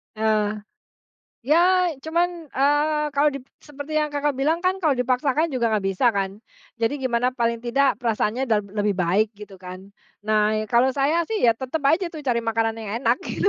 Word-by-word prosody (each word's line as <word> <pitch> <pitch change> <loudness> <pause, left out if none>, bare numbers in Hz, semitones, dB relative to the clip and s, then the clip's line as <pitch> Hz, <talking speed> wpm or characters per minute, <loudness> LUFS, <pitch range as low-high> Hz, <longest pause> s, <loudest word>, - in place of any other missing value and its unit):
Heeh, 215 -1 0 0.8
ya 355 +7 +3 0.2
cuman, 340 +2 +1 0.2
eee, 295 +2 +1
kalau 295 +1 +3
di 275 - -6 0.2
seperti 295 +1 -6
yang 300 -1 0
Kakak 290 -1 -1
bilang 315 +5 +1
kan 370 +1 +1
kalau 320 -7 +1
dipaksakan 260 +5 0
juga 235 -5 -1
enggak 205 -3 0
bisa 225 +5 +2
kan, 195 0 -2 0.4
jadi 235 +5 -1
gimana 250 -1 0
paling 235 -2 -2
tidak 270 +3 +2
perasaannya 230 +1 -1
udah 220 -5 +1 0.2
lebih 205 0 +1
baik 190 +4 +1
gitu 205 -2 -12
kan, 185 +1 -10 0.3
nah 215 0 +1 0.2
kalau 250 +2 +3
saya 300 +5 +1
sih 440 +2 -3
ya 225 - +3
tetap 265 +5 -4
aja 345 +3 +1
tuh 315 - -7
cari 240 -5 -1
makanan 225 0 0
yang 220 0 -5
enak 235 0 +2
gitu, 405 - 0
250 Hz, 180 wpm, -23 LUFS, 215-295 Hz, 0.8 s, ya